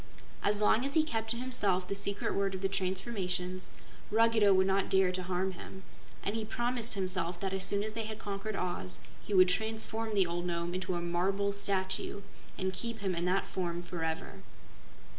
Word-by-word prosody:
As 210 +1 +4
long 220 +3 +4
as 275 +2 -2
he 315 - +6
kept 225 -7 -2
to 235 - -1
himself 205 -8 +1
the - - -1
secret 200 0 0
word 195 -1 0
of 185 - -5
the - - +4
transformations, 185 -1 -2 0.4
Ruggedo 220 -1 +5
would 190 0 +5
not 195 0 +2
dare 190 -1 +4
to 185 0 -2
harm 185 +1 0
him, 190 +1 -10 0.4
and 200 - -1
he 225 - -1
promised 240 +1 -1
himself 185 -2 0
that 195 0 -2
as 190 0 0
soon 200 +1 +3
as 215 0 -4
they 225 0 -3
had 215 0 -5
conquered 205 0 -4
Oz, 95 - -3 0.2
he 205 - -2
would 185 -1 +7
transform 220 +2 -1
the 195 -2 +5
old 175 +1 -2
Nome 170 0 -1
into 185 0 -2
a 175 - -1
marble 195 +4 +1
statue 195 0 -1 0.3
and 190 0 -1
keep 230 +2 -4
him 190 -2 0
in 170 0 -1
that 185 +2 +2
form 175 -2 -2
forever. 160 - -4
195 Hz, 195 wpm, -32 LUFS, 180-215 Hz, 0.4 s, would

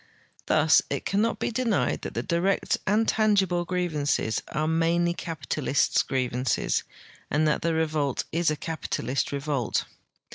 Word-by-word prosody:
Thus 155 0 +5
it - - -3
cannot 210 +4 +1
be - - -2
denied 230 -3 0
that - - -6
the - - -1
direct 180 +3 0
and 215 +3 +2
tangible 195 -5 +2
grievances 155 -10 0
are 155 +2 -2
mainly 170 +2 +2
capitalists' 145 -5 0
grievances 125 -1 0 0.5
and 155 +1 +2
that 150 - +1
the 165 -1 0
revolt 155 -4 0
is 170 0 +1
a 155 - 0
capitalist 140 -5 -3
revolt. 140 -4 -1
160 Hz, 135 wpm, -26 LUFS, 145-180 Hz, 0.5 s, Thus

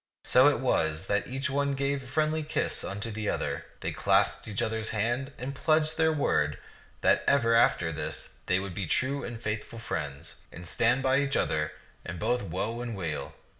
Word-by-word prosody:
So 130 +3 +6
it 145 - +3
was 80 -9 +1
that 100 +1 0
each 135 +2 -2
one 140 0 +1
gave 140 0 0
a 130 - -12
friendly 155 +4 +1
kiss 155 +1 -1
unto 100 +3 -4
the 105 -1 -2
other. - - -2 0.2
They - - -1
clasped - - +2
each 105 -2 -1
other's 110 0 -1
hand 120 +6 -1
and 130 +3 -4
pledged 155 +2 +2
their 160 0 +3
word 75 - +1 0.4
that - - +4
ever 120 -5 +4
after 90 -7 +4
this 80 0 -4 0.2
they 90 - +3
would 95 -1 -5
be 95 0 -3
true 140 - +1
and 120 -1 -6
faithful 110 0 -4
friends, 70 -10 -5
and 85 - -9
stand 120 +9 +2
by 130 0 +4
each 140 0 +1
other 75 0 0 0.3
in 90 0 -6
both 120 +8 0
woe 100 +6 -3
and 120 -2 -4
weal. 80 -5 -3
115 Hz, 190 wpm, -29 LUFS, 95-140 Hz, 0.4 s, So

